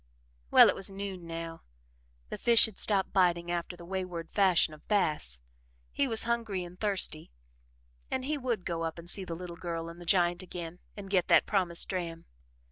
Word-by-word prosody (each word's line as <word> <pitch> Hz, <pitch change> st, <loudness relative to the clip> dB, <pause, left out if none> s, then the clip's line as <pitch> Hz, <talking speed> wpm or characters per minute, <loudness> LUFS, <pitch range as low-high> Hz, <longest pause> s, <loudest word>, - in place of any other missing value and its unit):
Well, -, -, +8 dB
it -, -, +3 dB
was 195 Hz, -, +1 dB
noon 195 Hz, -3 st, -6 dB
now, 165 Hz, 0 st, -6 dB, 0.7 s
the -, -, -5 dB
fish 235 Hz, -1 st, +6 dB
had 220 Hz, -3 st, -7 dB
stopped 195 Hz, -3 st, +2 dB
biting 175 Hz, -2 st, +2 dB
after 175 Hz, +1 st, -3 dB
the 170 Hz, -, -11 dB
wayward 180 Hz, -2 st, -5 dB
fashion 185 Hz, -6 st, +3 dB
of 150 Hz, -, -16 dB
bass, 150 Hz, -, 0 dB, 0.5 s
he 280 Hz, -, 0 dB
was 225 Hz, -3 st, +2 dB
hungry 230 Hz, -5 st, -1 dB
and 175 Hz, +1 st, -11 dB
thirsty 195 Hz, -7 st, -1 dB, 0.8 s
and 260 Hz, -1 st, -2 dB
he 305 Hz, +2 st, -1 dB
would 245 Hz, -9 st, -2 dB
go 170 Hz, -1 st, -2 dB
up 165 Hz, 0 st, -3 dB
and 170 Hz, 0 st, -10 dB
see 190 Hz, +2 st, -2 dB
the 170 Hz, -, -5 dB
little 175 Hz, 0 st, -8 dB
girl 165 Hz, -1 st, -4 dB
and 170 Hz, +1 st, -11 dB
the -, -, -9 dB
giant 175 Hz, -1 st, +3 dB
again 175 Hz, -1 st, -7 dB, 0.2 s
and 195 Hz, -1 st, -8 dB
get 185 Hz, -3 st, +2 dB
that -, -, +5 dB
promised 180 Hz, -4 st, +1 dB
dram. 170 Hz, -3 st, -4 dB
180 Hz, 190 wpm, -30 LUFS, 170-195 Hz, 0.8 s, Well